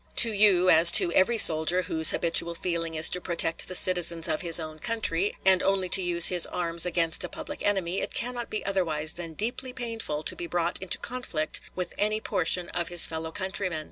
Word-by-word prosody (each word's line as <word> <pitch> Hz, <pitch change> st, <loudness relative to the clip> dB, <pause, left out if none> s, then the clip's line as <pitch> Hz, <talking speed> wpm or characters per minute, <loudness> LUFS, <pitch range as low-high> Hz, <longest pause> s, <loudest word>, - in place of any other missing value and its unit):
To 230 Hz, -, +4 dB
you, 195 Hz, -3 st, +4 dB
as 165 Hz, +1 st, +7 dB
to 170 Hz, -, +7 dB
every 230 Hz, +5 st, +1 dB
soldier, 170 Hz, -1 st, +6 dB
whose 160 Hz, -1 st, +4 dB
habitual 170 Hz, 0 st, 0 dB
feeling 165 Hz, -2 st, -5 dB
is 155 Hz, 0 st, +4 dB
to 180 Hz, -, -4 dB
protect 170 Hz, -1 st, -3 dB
the 185 Hz, -, -3 dB
citizens 175 Hz, -2 st, +2 dB
of 155 Hz, -, -4 dB
his 170 Hz, -2 st, +2 dB
own 155 Hz, -1 st, -10 dB
country, 205 Hz, -4 st, -3 dB
and 190 Hz, -1 st, +3 dB
only 195 Hz, -2 st, -2 dB
to 190 Hz, -, +2 dB
use 175 Hz, -2 st, +5 dB
his 180 Hz, -2 st, +4 dB
arms 170 Hz, 0 st, -2 dB
against 165 Hz, -2 st, -1 dB
a -, -, -7 dB
public -, -, -10 dB
enemy, 190 Hz, -3 st, -3 dB
it -, -, -6 dB
cannot 240 Hz, 0 st, -3 dB
be 215 Hz, -, -7 dB
otherwise 160 Hz, -6 st, -3 dB
than 170 Hz, -2 st, -10 dB
deeply 245 Hz, +5 st, -6 dB
painful 225 Hz, -12 st, -7 dB
to -, -, -1 dB
be 175 Hz, -, -7 dB
brought 175 Hz, 0 st, -3 dB
into 190 Hz, -, -5 dB
conflict 230 Hz, -11 st, -4 dB
with 180 Hz, -2 st, -7 dB
any 215 Hz, +1 st, -2 dB
portion 180 Hz, -4 st, -3 dB
of 170 Hz, -1 st, -5 dB
his 175 Hz, -1 st, +4 dB
fellow 160 Hz, 0 st, -7 dB
countrymen. 190 Hz, -2 st, -6 dB
175 Hz, 205 wpm, -24 LUFS, 165-195 Hz, -, as